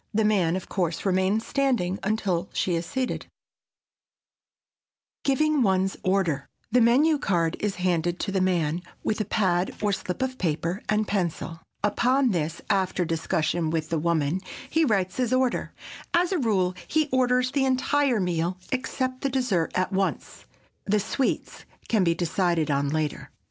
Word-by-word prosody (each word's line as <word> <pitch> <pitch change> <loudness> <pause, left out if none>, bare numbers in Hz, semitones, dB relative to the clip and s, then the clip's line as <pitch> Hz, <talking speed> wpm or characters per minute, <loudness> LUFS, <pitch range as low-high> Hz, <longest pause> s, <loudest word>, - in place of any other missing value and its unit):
The 220 0 +3
man, 185 -6 +2
of 190 - -5
course, 175 -3 -2
remains 190 +3 +1
standing 245 -10 0
until 195 -4 -1
she 180 - 0
is 165 0 -1
seated. 260 +4 -2
[Sidenote: - - -49
GIVING 300 +1 +2
ONE'S 190 -3 +2
ORDER] 180 -7 +1 0.2
The 250 +2 +4
menu 285 +7 +4
card 170 -6 +1
is 205 -2 -1
handed 175 -1 0
to 200 - -2
the 190 -1 +1
man, 175 -3 +1 0.2
with 215 0 0
a - - -1
pad 185 -3 +1
or 210 -1 +1
slip 185 +6 -3
of 260 0 -3
paper 170 +2 -1
and 215 0 +1
pencil. 170 -3 -2 0.2
Upon 250 +5 +2
this, 165 -2 -2
after 190 -3 +1
discussion 165 0 0
with 160 -1 -2
the 165 - 0
woman, 165 +1 0 0.3
he 320 0 +3
writes 195 -7 0
his 250 -2 0
order. 255 -1 +1 0.4
As 350 +1 +3
a 370 - +1
rule 195 -7 +1
he 310 -1 +1
orders 255 0 +2
the 275 -1 +1
entire 260 -1 +2
meal, 175 -1 -1
except 255 0 -2
the 275 - 0
dessert, 250 -11 0
at 185 +1 0
once. 190 0 -2 0.4
The 210 +1 +2
sweets 245 +6 -2 0.2
can 215 -4 +3
be 170 -1 +2
decided 170 -2 0
on 140 0 +1
later. 155 0 -2
190 Hz, 160 wpm, -26 LUFS, 170-250 Hz, 0.4 s, The